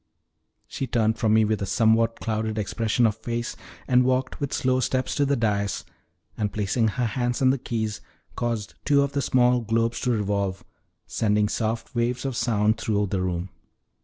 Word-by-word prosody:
She 135 Hz, -, -4 dB
turned 110 Hz, -2 st, +1 dB
from 110 Hz, -1 st, +3 dB
me 110 Hz, 0 st, +5 dB
with 110 Hz, -1 st, -1 dB
a 100 Hz, -, -2 dB
somewhat 115 Hz, +2 st, +2 dB
clouded 110 Hz, -1 st, -2 dB
expression 115 Hz, +3 st, +1 dB
of 110 Hz, -1 st, +1 dB
face, 120 Hz, +1 st, -4 dB, 0.3 s
and 125 Hz, 0 st, +4 dB
walked 130 Hz, 0 st, 0 dB
with 140 Hz, -2 st, -2 dB
slow 130 Hz, 0 st, +1 dB
steps 130 Hz, 0 st, 0 dB
to 145 Hz, -1 st, +1 dB
the 140 Hz, -, +2 dB
dais, 100 Hz, -4 st, -1 dB, 0.5 s
and 105 Hz, -2 st, -1 dB
placing 110 Hz, +2 st, 0 dB
her 120 Hz, +3 st, -1 dB
hands 120 Hz, +2 st, -1 dB
on 130 Hz, -1 st, +4 dB
the 135 Hz, -, -1 dB
keys, 110 Hz, -3 st, -3 dB, 0.3 s
caused 115 Hz, -4 st, -2 dB
two 140 Hz, -1 st, +4 dB
of 140 Hz, -, -2 dB
the 140 Hz, -, -1 dB
small 125 Hz, -1 st, +3 dB
globes 115 Hz, +1 st, 0 dB
to 125 Hz, -, -1 dB
revolve, 100 Hz, -3 st, -1 dB, 0.4 s
sending 105 Hz, -1 st, +1 dB
soft 115 Hz, +1 st, -2 dB
waves 120 Hz, +2 st, -1 dB
of 135 Hz, -2 st, -2 dB
sound 110 Hz, -2 st, +1 dB
through 105 Hz, -2 st, 0 dB
the 95 Hz, -, 0 dB
room. 90 Hz, 0 st, -2 dB
115 Hz, 180 wpm, -25 LUFS, 105-125 Hz, 0.5 s, me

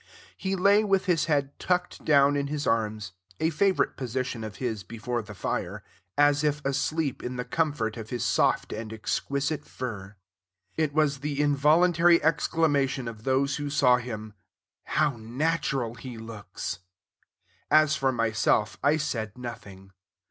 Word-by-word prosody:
He 195 Hz, 0 st, -2 dB
lay 200 Hz, +3 st, +4 dB
with 195 Hz, -3 st, +1 dB
his 165 Hz, -4 st, +2 dB
head 140 Hz, -3 st, -1 dB
tucked 180 Hz, -1 st, -1 dB
down 140 Hz, -1 st, +4 dB
in 140 Hz, 0 st, 0 dB
his 145 Hz, 0 st, -3 dB
arms, 110 Hz, -3 st, -1 dB, 0.3 s
a 160 Hz, -, +1 dB
favorite 190 Hz, +4 st, +1 dB
position 130 Hz, -2 st, -3 dB
of 110 Hz, -2 st, -6 dB
his 110 Hz, -2 st, -3 dB
before 115 Hz, +5 st, -4 dB
the 105 Hz, -1 st, -11 dB
fire, -, -, -3 dB, 0.3 s
as 145 Hz, 0 st, +4 dB
if 150 Hz, -1 st, +1 dB
asleep 140 Hz, +1 st, -1 dB
in 125 Hz, +1 st, -4 dB
the 125 Hz, 0 st, -4 dB
comfort 145 Hz, -10 st, -1 dB
of 110 Hz, -1 st, -7 dB
his 120 Hz, -2 st, -2 dB
soft -, -, +1 dB
and 110 Hz, 0 st, -6 dB
exquisite 140 Hz, +6 st, -2 dB
fur. 105 Hz, -8 st, -7 dB, 0.6 s
It 155 Hz, -2 st, 0 dB
was 150 Hz, -3 st, +2 dB
the 145 Hz, 0 st, -3 dB
involuntary 165 Hz, +4 st, +4 dB
exclamation 145 Hz, -5 st, +1 dB
of 110 Hz, -1 st, -8 dB
those 135 Hz, +1 st, +1 dB
who 145 Hz, -1 st, -3 dB
saw 130 Hz, -4 st, +4 dB
him, 110 Hz, -4 st, -6 dB, 0.5 s
"How 150 Hz, -4 st, +1 dB
natural 130 Hz, 0 st, -1 dB
he 125 Hz, -1 st, -9 dB
looks!" 105 Hz, -4 st, -6 dB, 0.9 s
As 155 Hz, 0 st, +5 dB
for 135 Hz, -2 st, +1 dB
myself, 110 Hz, -2 st, +1 dB
I 145 Hz, +3 st, +4 dB
said 115 Hz, -7 st, -3 dB
nothing. 100 Hz, -6 st, -9 dB
135 Hz, 150 wpm, -27 LUFS, 115-150 Hz, 0.9 s, As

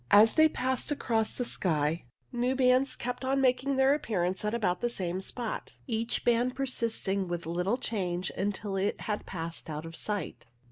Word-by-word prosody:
As 215 Hz, +2 st, +7 dB
they 315 Hz, 0 st, +6 dB
passed 260 Hz, -1 st, -1 dB
across 225 Hz, -6 st, 0 dB
the 245 Hz, -, -3 dB
sky 160 Hz, -, +1 dB, 0.3 s
new 245 Hz, +2 st, 0 dB
bands 255 Hz, +1 st, +3 dB
kept 250 Hz, +1 st, -4 dB
on 270 Hz, +1 st, +1 dB
making 265 Hz, +1 st, +2 dB
their 265 Hz, +1 st, +5 dB
appearance 190 Hz, -11 st, -1 dB
at 210 Hz, +2 st, 0 dB
about 180 Hz, -6 st, 0 dB
the 240 Hz, -, +1 dB
same 185 Hz, -5 st, -2 dB
spot, 230 Hz, +3 st, -5 dB
each 230 Hz, -1 st, -1 dB
band 240 Hz, +1 st, +3 dB
persisting 225 Hz, -7 st, -1 dB
with 175 Hz, -1 st, -3 dB
little 180 Hz, +7 st, 0 dB
change 185 Hz, -7 st, -2 dB
until 200 Hz, 0 st, -2 dB
it 195 Hz, +2 st, 0 dB
had 210 Hz, -1 st, -3 dB
passed 165 Hz, -2 st, -5 dB
out 155 Hz, +1 st, -4 dB
of 165 Hz, 0 st, -8 dB
sight. 205 Hz, -, -4 dB
220 Hz, 175 wpm, -30 LUFS, 180-250 Hz, 0.3 s, As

